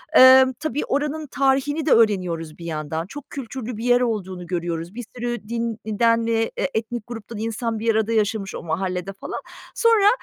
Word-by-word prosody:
emm, 260 Hz, 0 st, +8 dB
tabii 305 Hz, -1 st, -2 dB
oranın 300 Hz, +2 st, -1 dB
tarihini 275 Hz, +3 st, +1 dB
de 305 Hz, -, +2 dB
öğreniyoruz 180 Hz, -8 st, +2 dB
bir 170 Hz, -, -9 dB
yandan, 160 Hz, +1 st, -3 dB
çok 290 Hz, +6 st, -10 dB
kültürlü 250 Hz, -3 st, -6 dB
bir 225 Hz, -, -6 dB
yer 245 Hz, 0 st, +4 dB
olduğunu 190 Hz, -7 st, -2 dB
görüyoruz. 170 Hz, 0 st, -3 dB
Bir 245 Hz, -, -5 dB
sürü 240 Hz, -3 st, -4 dB
din 230 Hz, -1 st, -2 dB
e 215 Hz, 0 st, -4 dB
den 230 Hz, 0 st, +4 dB
eee, 225 Hz, 0 st, +1 dB, 0.2 s
etnik 225 Hz, 0 st, -3 dB
gruptan 230 Hz, -2 st, -7 dB
insan 225 Hz, 0 st, -2 dB
bir 225 Hz, 0 st, +1 dB
arada 220 Hz, +1 st, +1 dB
yaşamış 210 Hz, -2 st, 0 dB
o -, -, -6 dB
mahallede 180 Hz, +3 st, -2 dB
falan. -, -, -6 dB, 0.4 s
Sonra 455 Hz, -3 st, +5 dB
225 Hz, 175 wpm, -23 LUFS, 190-250 Hz, 0.4 s, emm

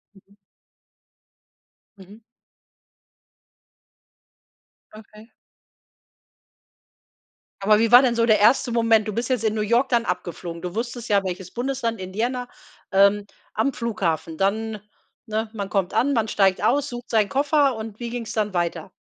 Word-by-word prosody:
Mhm. 195 Hz, +1 st, -23 dB, 1.6 s
Mhm. 200 Hz, +4 st, -15 dB, 2.7 s
Okay. 215 Hz, +1 st, -15 dB, 2.3 s
Aber 210 Hz, +2 st, +4 dB
wie 230 Hz, 0 st, +1 dB
war 245 Hz, +1 st, +10 dB
denn 250 Hz, -3 st, +1 dB
so 230 Hz, 0 st, +2 dB
der 220 Hz, -3 st, +4 dB
erste 240 Hz, +4 st, +4 dB
Moment? 225 Hz, -2 st, +3 dB
Du 215 Hz, -, -3 dB
bist 235 Hz, +4 st, -3 dB
jetzt 250 Hz, -4 st, 0 dB
in 220 Hz, -1 st, +1 dB
New 215 Hz, -, -1 dB
York 235 Hz, +5 st, +2 dB
dann 235 Hz, -2 st, +1 dB
abgeflogen. 175 Hz, -1 st, -5 dB
Du 180 Hz, +1 st, -6 dB
wusstest 235 Hz, +1 st, -4 dB
ja, 200 Hz, -2 st, +3 dB
welches 185 Hz, -1 st, -5 dB
Bundesland, 245 Hz, -3 st, -3 dB
Indiana, 235 Hz, +7 st, -3 dB, 0.4 s
ähm, 200 Hz, +1 st, +4 dB, 0.3 s
am 265 Hz, +6 st, 0 dB
Flughafen. 175 Hz, -9 st, -2 dB
Dann, 215 Hz, +3 st, -1 dB, 0.4 s
ne, 220 Hz, -1 st, -3 dB
man 200 Hz, -3 st, -5 dB
kommt 195 Hz, -3 st, -1 dB
an, 280 Hz, +4 st, +2 dB
man 225 Hz, -3 st, +1 dB
steigt 195 Hz, -3 st, +2 dB
aus, 285 Hz, +3 st, +2 dB
sucht 240 Hz, 0 st, -8 dB
seinen 215 Hz, -3 st, +2 dB
Koffer 280 Hz, -1 st, +2 dB
und 220 Hz, -1 st, -8 dB
wie 240 Hz, -1 st, -4 dB
ging's 235 Hz, -2 st, -5 dB
dann 210 Hz, -3 st, -1 dB
weiter? 175 Hz, 0 st, -2 dB
220 Hz, 140 wpm, -23 LUFS, 200-240 Hz, 2.7 s, war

